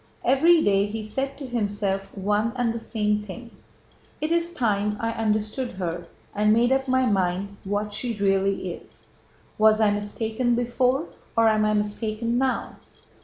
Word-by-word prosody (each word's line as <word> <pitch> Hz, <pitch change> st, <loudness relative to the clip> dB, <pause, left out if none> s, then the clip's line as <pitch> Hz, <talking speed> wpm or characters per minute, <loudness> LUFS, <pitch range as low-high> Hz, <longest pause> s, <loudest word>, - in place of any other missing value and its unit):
Every 315 Hz, +6 st, +5 dB
day 200 Hz, 0 st, +3 dB
he 215 Hz, +1 st, -5 dB
said 270 Hz, +6 st, -3 dB
to 285 Hz, -, -7 dB
himself 205 Hz, -5 st, -2 dB
one 210 Hz, +4 st, 0 dB
and 245 Hz, -2 st, 0 dB
the 230 Hz, -, -4 dB
same 210 Hz, -2 st, -1 dB
thing: 225 Hz, +4 st, -9 dB, 0.7 s
"It 305 Hz, +2 st, -2 dB
is 340 Hz, 0 st, +1 dB
time 210 Hz, -7 st, 0 dB
I 230 Hz, -1 st, -1 dB
understood 215 Hz, +3 st, -1 dB
her 175 Hz, -2 st, -4 dB, 0.3 s
and 210 Hz, +1 st, +2 dB
made 235 Hz, +3 st, +3 dB
up 265 Hz, 0 st, +1 dB
my 260 Hz, 0 st, +3 dB
mind 195 Hz, -1 st, 0 dB
what 205 Hz, +1 st, -2 dB
she 230 Hz, +1 st, -3 dB
really 195 Hz, -2 st, +1 dB
is. -, -, -15 dB, 0.5 s
Was 215 Hz, 0 st, +5 dB
I 215 Hz, -2 st, +4 dB
mistaken 220 Hz, +4 st, -1 dB
before, 250 Hz, +4 st, +1 dB, 0.3 s
or 230 Hz, 0 st, +5 dB
am 215 Hz, -1 st, +2 dB
I 215 Hz, 0 st, +2 dB
mistaken 215 Hz, +3 st, -1 dB
now? 265 Hz, -1 st, -1 dB
215 Hz, 160 wpm, -25 LUFS, 205-245 Hz, 0.7 s, Every